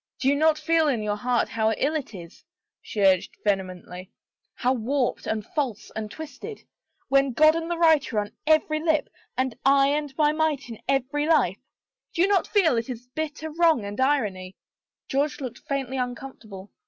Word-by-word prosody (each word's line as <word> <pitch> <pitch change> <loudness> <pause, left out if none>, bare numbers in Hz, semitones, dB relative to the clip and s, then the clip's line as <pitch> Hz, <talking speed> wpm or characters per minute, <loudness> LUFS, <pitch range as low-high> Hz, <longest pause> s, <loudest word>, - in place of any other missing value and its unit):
" - - -59
Do 265 - -1
you 280 - +4
not 310 +1 +3
feel 320 +1 +2
in 240 -7 0
your 210 -1 -1
heart 245 +2 +1
how 220 -1 +1
ill 280 +7 0
it 290 -8 -4
is," 170 -2 -11 0.4
she 210 - -5
urged 190 -2 +3
vehemently, 185 -2 -3 0.2
" - - -54
how 255 +1 +1
warped 255 +2 -1
and 215 -1 -2
false 260 -8 -3
and 215 -1 -4
twisted? 315 - -8 0.5
When 275 -1 +3
God 310 +5 +5
and 330 0 -3
the 345 - -1
Right 320 -5 +4
are 220 - -3
on 205 +1 -7 0.2
every 310 0 +3
lip 315 -1 +1 0.3
and 260 -2 0
I 275 0 +5
and 295 0 -1
my 300 -1 +4
Might 305 -4 -1
in 225 - -9
every 275 +2 0
life? 265 - +3 0.6
Do 340 - +3
you - - +4
not 395 -4 +2
feel 360 - +3
its 235 +1 -4
bitter 315 0 -4
wrong 320 -8 +3
and 205 +5 -4
irony?" 205 -10 0 0.5
62 270 - -4
HOPE - - +5
RENEWED 295 +1 0
George - - -13
looked 255 +3 -7
faintly 270 -2 -2
uncomfortable. 245 -6 -6
270 Hz, 195 wpm, -25 LUFS, 220-310 Hz, 0.6 s, God